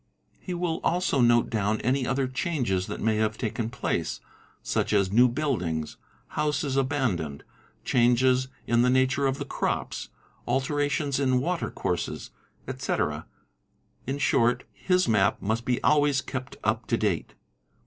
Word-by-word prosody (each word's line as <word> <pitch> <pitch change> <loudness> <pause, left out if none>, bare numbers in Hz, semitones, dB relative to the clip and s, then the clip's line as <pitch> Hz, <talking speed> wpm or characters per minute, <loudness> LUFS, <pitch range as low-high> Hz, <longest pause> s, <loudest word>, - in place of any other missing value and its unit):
He 180 - -5
will 170 -2 -1
also 175 -6 +1
note 120 -1 +4
down 110 0 0
any 130 +1 +1
other 135 0 0
changes 125 - -1
that - - -5
may 110 -1 +2
have 110 0 0
taken 110 0 -2
place, 125 - -2 0.4
such - - 0
as 100 -2 +2
new 120 +4 +6
buildings, 110 - -2 0.3
houses 150 -2 -1
abandoned, 130 - -1 0.4
changes 125 +1 +3 0.2
in 120 0 +3
the 125 - +4
nature 130 +2 +2
of 135 0 -1
the - - -4
crops, - - -3 0.4
alterations 145 +1 0
in 130 -2 +2
water 170 +5 -1
courses, 90 -2 -3 0.4
etc.; - - -2 0.8
in 135 +2 -1
short 120 -3 +2
' - - -23
Hf: 180 0 +5
7 160 - +2
i: - - +3
map 95 -2 +2
must 110 +3 -2
be 125 0 +1
always 145 -2 +3
kept 130 0 -6
up 110 +2 0
to 115 - +1
date. 100 -7 -1
125 Hz, 150 wpm, -27 LUFS, 110-140 Hz, 0.8 s, new